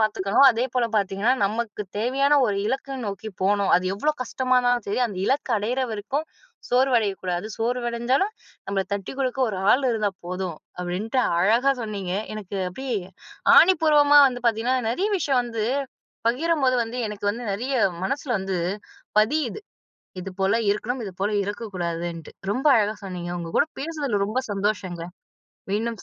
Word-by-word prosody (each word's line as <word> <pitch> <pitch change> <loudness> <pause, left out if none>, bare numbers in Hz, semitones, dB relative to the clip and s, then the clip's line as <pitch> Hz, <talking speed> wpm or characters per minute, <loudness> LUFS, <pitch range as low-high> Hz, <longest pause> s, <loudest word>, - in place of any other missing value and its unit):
பார்த்துக்கணும். 215 +3 +3
அதேபோல 245 +1 0
பார்த்தீங்கன்னா, 200 +4 +1
நமக்கு 210 +1 -2 0.2
தேவையான 275 +5 +2
ஒரு 205 - 0
இலக்க 270 +3 -2
நோக்கி 200 +2 -5
போணும். 200 0 +2
அது 180 - -1
எவ்வளோ 300 +10 +1
கஷ்டமா 255 +1 -1
இருந்தாலும் 245 -2 +1
சரி, 205 - 0
அந்த 195 -4 -7
இலக்க 275 0 0
அடையிற 235 +6 -1
வரைக்கும் 220 +8 -3 0.5
சோர்வடையக்கூடாது. 215 -8 +1
சோர்வடஞ்சாலும் 240 - 0 0.3
நம்மள 195 0 0
தட்டிக் 200 +7 -4
குடுக்க 260 0 -1
ஒரு 195 - -3
ஆள் 270 +1 +2
இருந்தா 215 -3 0 0.2
போதும். 180 -2 -4 0.2
அப்படின்ட்டு 195 +8 -1 0.2
அழகா 235 +8 +4
சொன்னீங்க. 200 -4 -4 0.2
எனக்கு 200 -2 -6
அப்படியே 255 +3 -3 0.6
ஆணிபூர்வமா 300 -5 +6
வந்து 245 -1 -6
பார்த்தீங்கன்னா, 235 +3 +2
நெறைய 375 - 0
விஷயம் 265 -6 +2
வந்து 230 -3 -3 0.6
பகிரும்போது, 270 0 +2
வந்து 235 +3 -6
எனக்கு 210 -1 -7
வந்து 230 +4 -6
நெறைய 245 +7 -3 0.3
மனசில 275 +3 -2
வந்து, 190 -1 -2 0.6
பதியுது, 275 - +1 0.6
இது 195 - -6
போல 195 +3 +3 0.2
இருக்கணும். 240 +5 -2
இது 190 - -6
போல 205 +2 +1
இருக்கக்கூடாதுன்ட்டு. 175 -5 -4 0.2
ரொம்ப 260 +7 -2
அழகா 210 0 +1
சொன்னீங்க. 180 -2 -5
உங்க 170 -1 -6
கூட - - +4
பேசுனதில 280 -9 -1
ரொம்ப 250 +5 -1
சந்தோஷங்க, 195 -4 -2 0.7
மீண்டும் 225 +1 -2
225 Hz, 140 wpm, -24 LUFS, 200-260 Hz, 0.7 s, ஆணிபூர்வமா